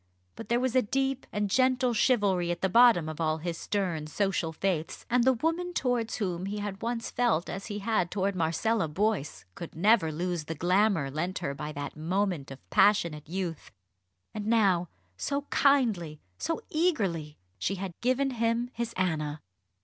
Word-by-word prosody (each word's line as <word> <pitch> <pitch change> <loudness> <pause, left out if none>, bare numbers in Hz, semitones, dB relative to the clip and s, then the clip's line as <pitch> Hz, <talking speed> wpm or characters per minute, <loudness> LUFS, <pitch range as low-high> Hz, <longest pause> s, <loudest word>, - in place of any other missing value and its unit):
But - - -9
there 235 +1 +3
was 255 0 -1
a 255 - +6
deep 270 +3 -1
and 205 0 0
gentle 255 +2 +2
chivalry 205 -7 +2
at 175 0 -2
the 190 - +2
bottom 230 -6 +6
of 155 +1 -5
all 155 -1 +1
his 170 +1 -4
stern 175 -5 -2
social 170 -1 -1
faiths; 165 -1 -2
and 245 0 +4
the 260 +1 +5
woman 330 +7 -1
towards 245 -3 0
whom 185 -3 -2
he 205 +1 -3
had 205 -1 -5
once 230 0 -3
felt 235 -9 +1
as 195 +1 -6
he 205 -1 -4
had 205 -4 0
towards 195 0 -1
Marcella 170 +4 +1
Boyce 190 -1 -1
could 170 - -9
never 190 -1 +4
lose 170 0 -2
the 160 - -4
glamour 180 -3 +2
lent 175 +6 -2
her 140 -6 -3
by 150 +2 -5
that 145 -1 -5
moment 175 -1 -1
of 135 0 -12
passionate 170 -7 +3
youth. 175 -3 -4 0.6
And 210 -1 -4
now, 195 -7 +3 0.3
so 280 - -2
kindly, 220 - +2 0.2
so 330 - -2
eagerly! 195 - 0 0.2
she 190 - -1
had 190 -1 -5
given 255 +2 +1
him 235 0 0
his 235 0 -3
Anna. 155 -5 -1
195 Hz, 170 wpm, -29 LUFS, 165-235 Hz, 0.6 s, a